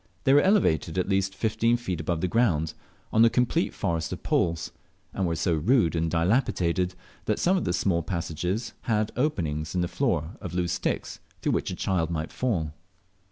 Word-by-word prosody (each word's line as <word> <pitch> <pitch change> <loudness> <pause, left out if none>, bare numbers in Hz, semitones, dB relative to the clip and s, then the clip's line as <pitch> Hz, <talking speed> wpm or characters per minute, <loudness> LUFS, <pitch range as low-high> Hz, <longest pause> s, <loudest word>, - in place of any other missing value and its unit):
They 135 - +4
were 145 - +7
elevated 145 - +2
at 90 - +1
least 95 -1 0
fifteen 115 +3 +1
feet 95 -9 -3
above 80 0 -1
the 90 - +1
ground, 85 -8 +1 0.4
on 110 - +6
a 115 - +7
complete 125 0 +1
forest 80 -1 -2
of - - -6
poles, 85 -1 0 0.4
and 95 - 0
were 85 - 0
so 85 +2 +1
rude 85 - +3
and 80 0 0
dilapidated 90 -1 +1 0.3
that - - +1
some 185 +2 +2
of 185 - 0
the - - 0
small 90 -1 +1
passages 90 +6 -3 0.2
had 110 -1 +1
openings 80 - -1
in 90 - +2
the 90 - 0
floor 85 - -1
of 90 -4 -6
loose 90 -1 0
sticks, 90 - -2 0.2
through - - +2
which - - 0
a - - -3
child 85 -4 0
might 80 -1 -3
fall. 85 -12 -1
90 Hz, 190 wpm, -27 LUFS, 85-115 Hz, 0.4 s, were